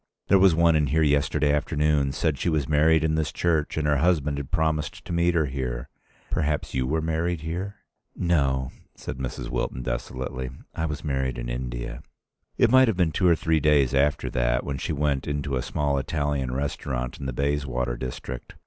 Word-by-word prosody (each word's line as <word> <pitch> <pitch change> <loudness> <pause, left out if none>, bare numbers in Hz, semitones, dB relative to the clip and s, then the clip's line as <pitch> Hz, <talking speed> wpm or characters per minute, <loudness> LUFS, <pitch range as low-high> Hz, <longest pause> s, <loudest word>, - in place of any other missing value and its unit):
There 100 - +6
was 95 -3 +6
one 85 0 +4
in 75 -2 +2
here 80 +4 +2
yesterday 75 0 +2
afternoon 75 -1 +1
said 75 0 -1
she - - 0
was 75 -4 0
married 80 +1 +4
in 80 0 +1
this 80 0 0
church 80 -4 0
and 80 - 0
her 75 -1 +3
husband 75 -3 +1
had 70 - -6
promised 80 -2 -1
to - - -4
meet 85 +1 +2
her 80 -2 +3
here. 65 -3 -4 0.4
Perhaps 75 -1 -1
you 65 -1 0
were 80 +3 0
married 80 +1 -1
here?" 90 +5 -4 0.4
"No," 70 -7 +1 0.2
said - - -7
Mrs. 65 -2 -4
Wilton, 65 - -2
desolately. 65 +1 -4 0.2
"I 80 - -2
was 75 -1 -5
married 65 -3 -1
in - - -4
India." - - -4 0.6
It 115 - +4
might 130 0 +7
have 110 -5 0
been 85 -4 +2
two 90 +3 +2
or 85 - +6
three 80 0 +1
days 70 -3 +3
after 70 +1 +2
that, - - +1
when 70 -1 -4
she - - -3
went 70 -2 0
into 70 -1 -2
a 65 - 0
small 70 +1 0
Italian 70 -2 -1
restaurant 65 -2 -3
in 70 - -4
the - - -2
Bayswater 70 -2 -1
district. 60 0 -6
75 Hz, 195 wpm, -25 LUFS, 65-80 Hz, 0.6 s, might